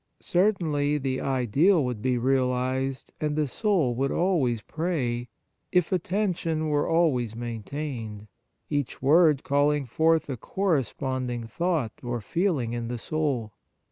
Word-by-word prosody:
Certainly 160 -7 +1
the 130 -2 -2
ideal 135 - +3
would 125 -4 -3
be 125 0 +1
realized 130 +1 0
and 150 -1 0
the 150 -1 +1
soul 170 - +1
would 135 +3 0
always 140 - +1
pray, 130 -8 -2 0.4
if 180 -2 +2
attention 175 -4 0
were 145 -1 +1
always 135 -10 +2
main 115 -1 -5
tained, 115 -5 -6 0.4
each 145 -4 -2
word 150 0 +5
calling 145 0 +2
forth 160 +6 +2
a 135 -3 -4
corresponding 130 - -1
thought 155 -1 -1
or 120 -1 -3
feeling 140 - 0
in 120 -1 -3
the 120 +1 -3
soul. 130 -6 -2
140 Hz, 130 wpm, -26 LUFS, 120-160 Hz, 0.4 s, word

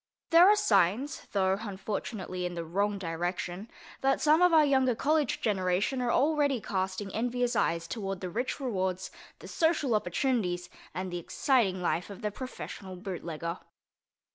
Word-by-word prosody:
There 340 +3 +8
are 420 - +7
signs 215 - +1
(though, 190 -1 +2
unfortunately, 195 -2 -4
in 175 0 -3
the 170 -1 -4
wrong 200 +5 0
direction) 175 +3 -3 0.3
that 270 0 +2
some 310 +2 +4
of 360 0 +6
our 315 -2 +6
younger 265 -3 +3
college 300 +2 +1
generation 200 +4 0
are 240 -1 +1
already 285 -1 +2
casting 190 0 -3
envious 245 +2 0
eyes 165 0 +1
toward 195 -2 -4
the 185 - -4
rich 245 - -2
rewards, 185 -7 -2 0.3
the - - -11
social 320 -6 +1
opportunities 185 -3 0 0.3
and 185 0 -3
the 175 - -3
exciting 195 - +1
life 170 +2 0
of 200 - -10
the 210 - -1
professional 205 -5 -7
bootlegger. 170 -3 -5
200 Hz, 150 wpm, -29 LUFS, 180-260 Hz, 0.3 s, There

